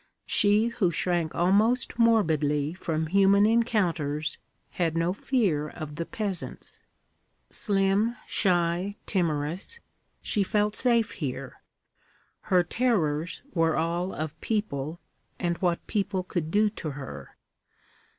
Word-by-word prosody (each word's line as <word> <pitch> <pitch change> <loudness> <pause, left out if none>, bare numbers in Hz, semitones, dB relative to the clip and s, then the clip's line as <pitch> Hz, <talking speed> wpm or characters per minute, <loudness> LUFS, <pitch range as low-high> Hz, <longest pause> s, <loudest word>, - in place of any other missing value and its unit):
She 210 +3 +4
who 205 -6 +1
shrank 170 -1 -1
almost 215 +8 +3
morbidly 155 -10 +2
from 160 -3 -2
human 195 +4 +4
encounters, 175 -10 0 0.3
had 165 -2 -1
no 170 +2 +1
fear 190 - 0
of 150 0 -7
the 170 - -3
peasants. 200 -5 -5 0.7
Slim, 200 +3 +1
shy, 180 +1 +1
timorous, 170 - -2 0.4
she 210 - +1
felt 210 +1 0
safe 235 -3 +2
here. 135 -3 -5 0.9
Her 180 -2 +5
terrors 175 -7 0
were 165 -2 +2
all 170 +3 -1
of 155 +1 -5
people 170 -8 -2 0.4
and 175 -2 -1
what 175 -2 0
people 195 -3 -1
could 175 -3 -3
do 210 +4 +3
to 170 -6 -5
her. 135 -2 -9
180 Hz, 110 wpm, -27 LUFS, 160-210 Hz, 0.9 s, Her